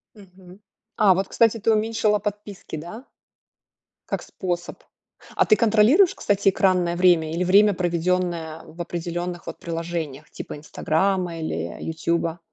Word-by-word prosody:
Мгм. 190 -2 -16 0.4
А 205 -3 +5
вот, 190 +2 -1
кстати, 230 0 +2
ты 225 - +2
уменьшила 215 -1 +1
подписки, 205 -4 -6
да? 195 - -9 1.0
Как - - -2
способ. 175 -1 -5 0.5
А - - +3
ты - - +5
контролируешь, 230 - +4
кстати, 200 -1 +1
экранное 180 -3 +1
время 170 -3 +3
или 170 +2 0
время, 200 +3 +5
проведенное 175 -2 -1
в 165 - -16
определенных, 175 +1 -5
вот, - - -6
приложениях 165 -4 -5
типа - - -8
"Инстаграма" 170 +3 -1
или 85 - -4
"Ютуба"? 165 +1 -2
180 Hz, 130 wpm, -23 LUFS, 170-205 Hz, 1.0 s, А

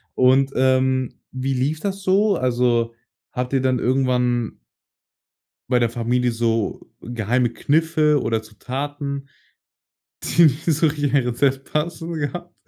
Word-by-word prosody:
Und, 130 +1 +4
ähm, 130 0 +2 0.2
wie 130 +1 -2
lief 140 +5 -1
das 195 +2 -3
so? 200 +2 +3
Also, 120 -3 +1 0.4
hat 125 0 -3
dir 135 -1 +1
dann 130 -1 +1
irgendwann 125 - 0 1.1
bei 125 - +4
der 120 -1 +2
Familie 120 +1 0
so 115 -2 -1
geheime 120 +1 0
Kniffe 155 +2 +2
oder 115 -1 0
Zutaten, 140 +5 -5 1.0
die 170 - +3
nicht 155 +2 +1
so 160 -1 +2
richtig 145 -1 -2
in - - +2
ein 135 - +3
Rezept 135 +2 0
passen, 165 +2 -2
gehabt? 165 +3 -4
130 Hz, 135 wpm, -22 LUFS, 125-150 Hz, 1.1 s, Und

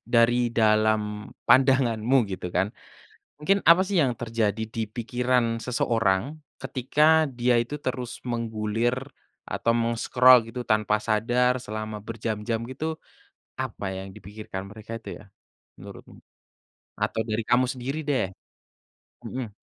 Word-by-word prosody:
dari 115 +1 +5 0.2
dalam 110 0 +4 0.5
pandanganmu 130 -2 +4
gitu 90 -1 -4
kan, 95 +2 +2 0.7
mungkin 195 +6 +1
apa 175 +2 +8
sih 200 - -2
yang 130 - +1
terjadi 110 -2 -1
di 115 - -1
pikiran 120 -1 0
seseorang, 115 +1 0 0.3
ketika 150 +5 +3
dia 120 0 +3
itu 145 +5 -6
terus 125 -1 -4
menggulir 115 0 -1 0.5
atau 115 - 0
meng-scroll 120 +2 +5
gitu 125 0 -4
tanpa 105 -1 +2
sadar 120 +3 +2
selama 110 -1 -6
berjam-jam 110 0 -3
gitu, 160 +4 -4 0.6
apa - - -5
yang 95 - -7
dipikirkan 105 -1 -8
mereka 110 +2 -8
itu 115 - -8
ya, - - -14 0.5
menurutmu? - - -12 0.8
Atau 110 - -1
dari 110 +1 -1
kamu 120 +3 +3
sendiri 130 +3 -4
deh? 130 -10 +1 0.9
Mhm. 125 -3 -5
115 Hz, 120 wpm, -26 LUFS, 110-125 Hz, 0.9 s, apa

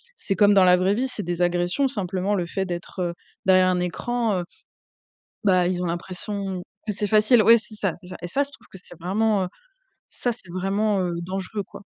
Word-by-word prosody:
c'est 195 - -2
comme 205 -1 +5
dans 195 - +7
la 180 0 +7
vraie 185 +3 +2
vie, 255 +4 0
c'est 250 - -4
des 175 0 -1
agressions. 175 +10 +1
Simplement, 195 -4 -2
le 175 -3 -1
fait 190 +2 -2
d'être, 175 +1 -6
heu, 175 -1 -2 0.3
derrière 185 -1 +5
un 180 -1 +2
écran, 215 +4 -1
heu, - - -2 1.0
bah, 185 -3 +4
ils 180 0 -1
ont 180 - -1
l'impression 185 +2 -4 0.3
que 210 - 0
c'est 210 +1 -1
facile. 215 +3 +5
Oui, 230 +2 +8
c'est 220 0 -5
ça, 200 -4 -1
c'est 180 - -14
ça 185 - -7
et - - -3
ça, 270 +11 +1
je 285 - -5
trouve 275 - -17
que 190 - -11
c'est 175 - -12
vraiment 200 +3 +1
heu, 180 - -4 0.6
ça, 245 - -2
c'est 220 -6 -10
vraiment, 195 +2 0
heu, 180 -1 -1
dangereux, 195 +3 -4
quoi. - - -11
190 Hz, 220 wpm, -24 LUFS, 180-210 Hz, 1.0 s, Oui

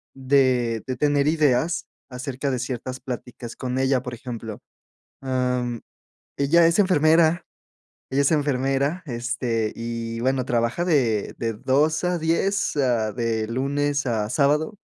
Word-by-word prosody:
de 130 -4 +2
de 130 - -2
tener 145 -1 +2
ideas 155 +1 +2 0.2
acerca 130 +2 -4
de 130 - -1
ciertas 130 0 -4
pláticas 125 -1 -7
con 130 -1 -3
ella, 130 -1 +2
por 125 -1 -6
ejemplo, 115 -3 -7 0.6
em, 125 -2 -1 0.6
ella 165 +4 +4
es 170 +4 +2
enfermera 165 -2 +4 0.7
ella 140 - +2
es 140 - +2
enfermera, 140 +2 +1
este, 120 -3 -2
y 115 0 -4
bueno, 130 +1 0
trabaja 120 +8 0
de 120 - +1
de 115 -1 -1
2 145 +9 +1
a 180 -1 0
10, 170 +5 0
ah, 120 -6 +1
de 115 -2 -1
lunes 140 +3 -1
a 110 -3 -1
sábado 150 - +1
130 Hz, 135 wpm, -23 LUFS, 120-145 Hz, 0.7 s, ella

